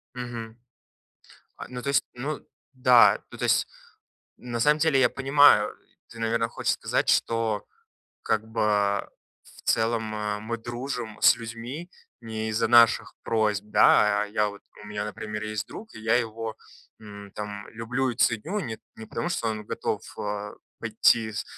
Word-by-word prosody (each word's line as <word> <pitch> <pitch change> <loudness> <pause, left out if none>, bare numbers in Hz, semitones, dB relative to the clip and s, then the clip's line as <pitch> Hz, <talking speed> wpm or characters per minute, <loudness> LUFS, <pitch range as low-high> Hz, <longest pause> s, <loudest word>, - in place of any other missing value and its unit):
Мгм. 115 -2 -6 1.0
А, - - -8
ну 125 -1 -7
то 140 - -4
есть 140 - +3
ну 140 +5 -4 0.3
да 125 -2 +6
ну, - - -11
то - - -3
есть - - +3 0.7
на 120 -1 -4
самом 150 +5 +4
деле, 155 -3 +3
я 125 - +5
понимаю. 135 -6 +5 0.4
Ты, 115 - -11
наверно, 115 0 0
хочешь - - -1
сказать, - - -1
что 115 -3 +1 0.6
как 110 -1 0
бы 110 0 -4 0.8
в - - -18
целом, 115 0 +1 0.4
мы 115 +1 -2
дружим 120 -1 -5
с - - +7
людьми 120 +9 -7 0.3
не 110 -1 -4
из-за 110 +1 0
наших 120 -1 +5
просьб, 105 -3 +1
да? 105 0 +5
А - - -3
я 105 0 0
вот 100 -1 -10 0.2
у - - -11
меня, 105 0 -4
например, 105 0 -5
есть 110 -1 -3
друг, 220 - -9
и - - -9
я 110 +1 +2
его, 115 -1 -5 0.5
м, 100 -2 -11
там, 105 -1 -6
люблю 125 +4 -2
и - - -5
ценю 160 - +1
не 110 -9 -5 0.2
не 110 - -10
потому, 115 - -3
что 115 - -1
он 110 -1 -4
готов, - - -2 0.2
а, 105 0 -4 0.3
пойти 115 0 +2
с 105 - -4
115 Hz, 160 wpm, -26 LUFS, 105-120 Hz, 1.0 s, с